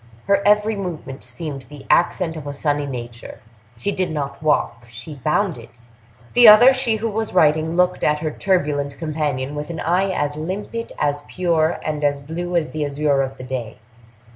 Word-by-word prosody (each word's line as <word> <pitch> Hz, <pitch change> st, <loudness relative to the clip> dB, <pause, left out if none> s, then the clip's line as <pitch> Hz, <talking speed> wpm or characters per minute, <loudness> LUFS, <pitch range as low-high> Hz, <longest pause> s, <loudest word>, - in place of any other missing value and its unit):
Her 200 Hz, 0 st, +3 dB
every 210 Hz, +1 st, +3 dB
movement 170 Hz, -8 st, -6 dB
seemed 140 Hz, -6 st, -7 dB
the 145 Hz, -2 st, -11 dB
accent 170 Hz, -1 st, +2 dB
of 150 Hz, -3 st, -7 dB
a 145 Hz, -, -4 dB
sunny 145 Hz, 0 st, -1 dB
nature; 120 Hz, -2 st, -7 dB, 0.4 s
she 160 Hz, +13 st, -1 dB
did 185 Hz, -2 st, -1 dB
not 140 Hz, -3 st, -4 dB
walk—she 120 Hz, -3 st, -2 dB
bounded. 155 Hz, -, 0 dB, 0.6 s
The 245 Hz, -1 st, +8 dB
other, 240 Hz, +5 st, +9 dB
she 255 Hz, -4 st, +1 dB
who 220 Hz, +1 st, -2 dB
was 220 Hz, -1 st, -3 dB
writing, 155 Hz, -1 st, +3 dB
looked 180 Hz, 0 st, +1 dB
at 150 Hz, 0 st, +3 dB
her 155 Hz, 0 st, -3 dB
turbulent 145 Hz, -6 st, -1 dB
companion 150 Hz, -4 st, -2 dB
with 150 Hz, 0 st, -5 dB
an 170 Hz, -, -5 dB
eye 180 Hz, +4 st, +1 dB
as 145 Hz, -5 st, -1 dB
limpid, 195 Hz, +8 st, -5 dB
as 145 Hz, 0 st, 0 dB
pure, 170 Hz, -3 st, +1 dB
and 150 Hz, -1 st, -3 dB
as 145 Hz, -1 st, +1 dB
blue 170 Hz, +5 st, -5 dB
as 165 Hz, -2 st, 0 dB
the 155 Hz, -1 st, -2 dB
azure 145 Hz, -1 st, +1 dB
of 135 Hz, 0 st, -4 dB
the -, -, -9 dB
day. 125 Hz, -3 st, -5 dB
155 Hz, 175 wpm, -21 LUFS, 145-180 Hz, 0.6 s, other